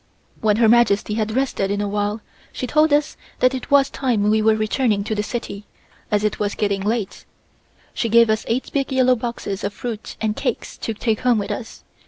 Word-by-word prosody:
When 215 -2 +2
Her 230 -1 +4
Majesty 215 -2 +3
had 215 0 -1
rested 260 -7 0
a 205 - -1
while, 205 +1 -2 0.3
she - - -4
told 305 +4 +3
us 295 +1 +1 0.2
that 255 +1 +3
it 260 - -5
was 280 -1 +5
time 220 -6 +1
we 220 0 +3
were 220 0 +4
returning 215 -1 0
to 220 - -3
the 210 - 0
city, 210 -2 -5 0.4
as 210 0 +1
it 215 - -1
was 205 -1 -1
getting 200 -2 0
late. 210 -1 -2 0.7
She 230 - -1
gave 235 +1 +6
us 220 0 0
eight 245 +3 -2
big 275 -1 -1
yellow 255 -1 +4
boxes 225 -4 -4
of 205 +1 -3
fruit 230 -3 -6
and 215 -1 -1
cakes 270 -4 -3
to 225 - -3
take 220 0 -1
home 250 -2 +2
with 205 0 -2
us. 225 +2 -7
220 Hz, 205 wpm, -21 LUFS, 210-250 Hz, 0.7 s, gave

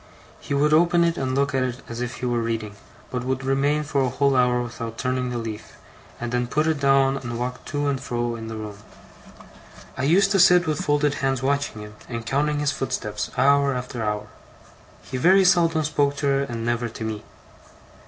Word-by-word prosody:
He 140 - -3
would 150 +2 +3
open 170 +2 +4
it 170 0 +1
and 130 -3 -2
look 140 0 +1
at 135 - +1
it 125 -1 -3
as 115 +1 -6
if 125 -1 -3
he 125 - -5
were 120 -1 0
reading, 110 -2 -3 0.4
but 125 -1 -3
would 130 +1 -2
remain 140 +3 +1
for 145 -2 0
a 130 - +1
whole 140 +2 +1
hour 125 -1 +3
without 115 -1 -6
turning 125 0 -1
the 120 - -3
leaf, 110 -2 -6 0.5
and 120 0 -4
then 125 0 0
put 150 +5 0
it 160 -2 0
down 135 -1 +3
and 120 -3 -5
walk 125 +1 -4
to 145 -1 -2
and 135 -2 -1
fro 120 -3 -2
in 115 -1 -7
the 110 - -6
room. 105 -2 -7 1.2
I - - -4
used 195 +6 +4
to 195 - +3
sit 180 0 +6
with 155 -2 -1
folded 145 0 +2
hands 135 -2 0
watching 140 -5 -1
him, 105 0 -10 0.2
and 115 -2 -5
counting 145 +4 0
his 145 -1 +1
footsteps, 115 -7 -3
hour 140 +1 +4
after 125 -1 -5
hour. 105 -1 -2 0.8
He 130 - -5
very 190 +8 +5
seldom 170 -3 +3
spoke 145 -2 +1
to 140 - -3
her, 140 0 +2
and 115 -3 -5
never 120 0 -1
to 110 - -8
me. 110 -1 -4
130 Hz, 210 wpm, -23 LUFS, 120-145 Hz, 1.2 s, sit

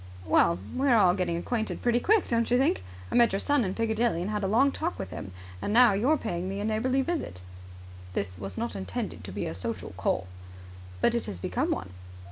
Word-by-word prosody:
"Well, 85 -1 +4 0.2
we're 265 -2 +3
all 185 -4 +5
getting 180 -3 -1
acquainted 220 +5 -3
pretty 240 0 +3
quick, 425 - +3
don't 230 -1 +1
you 245 - +4
think? 260 - +2 0.3
I - - -4
met 240 -1 +5
your 195 - +1
son 290 0 +2
in 190 -2 -2
Piccadilly 225 -5 +1
and 200 - -3
had 210 -1 -2
a - - +1
long 255 +8 +4
talk 90 - -3
with 95 - -6
him, 95 - -7 0.3
and - - -2
now 235 -1 +6
you 215 +8 +1
are 310 - +4
paying 185 -7 -3
me 195 +1 -4
a 205 - -2
neighbourly 250 +5 +1
visit." 295 - -3 0.7
"This 90 -1 -3
was 95 -1 -5
not 120 -3 -2
intended 95 -1 -4
to - - -7
be - - -3
a 80 - -3
social 90 - -4
call." 95 - 0 0.8
"But - - +4
it 235 - -1
has 95 - -5
become 90 - -1
one." 90 0 -2
210 Hz, 225 wpm, -28 LUFS, -, 0.8 s, now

